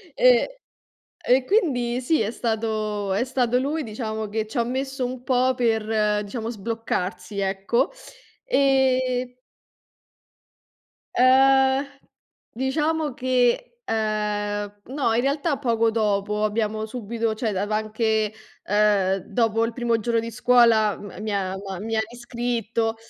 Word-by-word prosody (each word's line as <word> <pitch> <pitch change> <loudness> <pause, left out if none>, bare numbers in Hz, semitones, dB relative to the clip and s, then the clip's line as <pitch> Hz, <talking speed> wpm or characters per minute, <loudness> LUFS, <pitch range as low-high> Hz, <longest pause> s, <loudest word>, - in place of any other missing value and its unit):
e - - +4 0.7
e 255 +1 +4
quindi, 255 - +1
sì, 305 +3 +1
è 215 - 0
stato 215 -3 -2
è 205 +6 +1
stato 250 -2 +1
lui, 295 +5 -1
diciamo, 220 -2 -4
che 220 +1 -2
c'ha 235 +2 -1
messo 265 +1 -3
un 250 0 -5
po' 255 0 +2
per, 220 -3 +1
diciamo, 225 +2 -5
sbloccarsi, 200 -3 -4
ecco, 195 +4 0 0.5
e 260 - +2 1.8
Ehm, 265 +1 +5 0.7
diciamo 300 +3 -1
che, 255 - 0
ehm, 205 - -2
no, 265 -3 0
in 235 - +2
realtà 280 +3 0
poco 230 -4 +1
dopo, 210 -1 0
abbiamo 215 0 -1
subito 230 0 -3
cioè 220 0 -1
dav 200 +1 -2
anche, 215 0 0 0.3
uhm, 205 -2 +2
dopo 225 +2 0
il 230 - -4
primo 235 -1 0
giorno 230 +1 0
di 230 0 -6
scuola, 230 -3 +4
mi 205 +1 -6
ha 190 -1 -1
m'ha 190 -2 -6
mi 225 +3 -3
ha - - +3
riscritto. 235 -2 -2
230 Hz, 120 wpm, -24 LUFS, 215-255 Hz, 1.8 s, Ehm